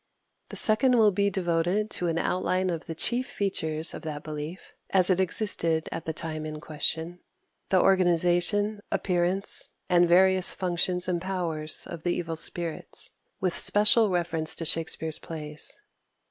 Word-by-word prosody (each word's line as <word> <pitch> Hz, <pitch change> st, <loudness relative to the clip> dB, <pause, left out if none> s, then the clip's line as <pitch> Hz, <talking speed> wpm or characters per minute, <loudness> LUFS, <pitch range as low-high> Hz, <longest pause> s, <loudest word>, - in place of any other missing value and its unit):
The -, -, -8 dB
second 245 Hz, +3 st, +4 dB
will 215 Hz, -2 st, +5 dB
be 200 Hz, +1 st, +1 dB
devoted 180 Hz, +3 st, 0 dB
to 175 Hz, -, -2 dB
an 165 Hz, -1 st, -1 dB
outline 185 Hz, +1 st, 0 dB
of 165 Hz, 0 st, -5 dB
the 165 Hz, -, -5 dB
chief 245 Hz, +10 st, -1 dB
features 160 Hz, -8 st, -1 dB
of -, -, -7 dB
that 150 Hz, -2 st, -6 dB
belief, 155 Hz, +3 st, -7 dB, 0.2 s
as 190 Hz, -1 st, +4 dB
it 185 Hz, -, +1 dB
existed 170 Hz, -4 st, 0 dB
at 165 Hz, -, -6 dB
the 160 Hz, -, -2 dB
time 155 Hz, -1 st, -5 dB
in 155 Hz, 0 st, -6 dB
question 160 Hz, +3 st, -2 dB, 0.5 s
the 190 Hz, -, +3 dB
organization, 185 Hz, +3 st, +2 dB
appearance, 180 Hz, +1 st, -1 dB, 0.2 s
and 175 Hz, -1 st, +4 dB
various 185 Hz, +1 st, +4 dB
functions 180 Hz, 0 st, 0 dB
and 175 Hz, -2 st, -1 dB
powers 170 Hz, -5 st, -2 dB
of 170 Hz, -2 st, -8 dB
the 175 Hz, +1 st, -1 dB
evil 165 Hz, -2 st, -4 dB
spirits, 165 Hz, 0 st, -3 dB, 0.3 s
with 185 Hz, -2 st, -1 dB
special 210 Hz, +1 st, +5 dB
reference 170 Hz, -3 st, +1 dB
to 165 Hz, -, -5 dB
Shakspere's 160 Hz, -1 st, 0 dB
plays. 150 Hz, -2 st, -3 dB
175 Hz, 150 wpm, -26 LUFS, 160-190 Hz, 0.5 s, will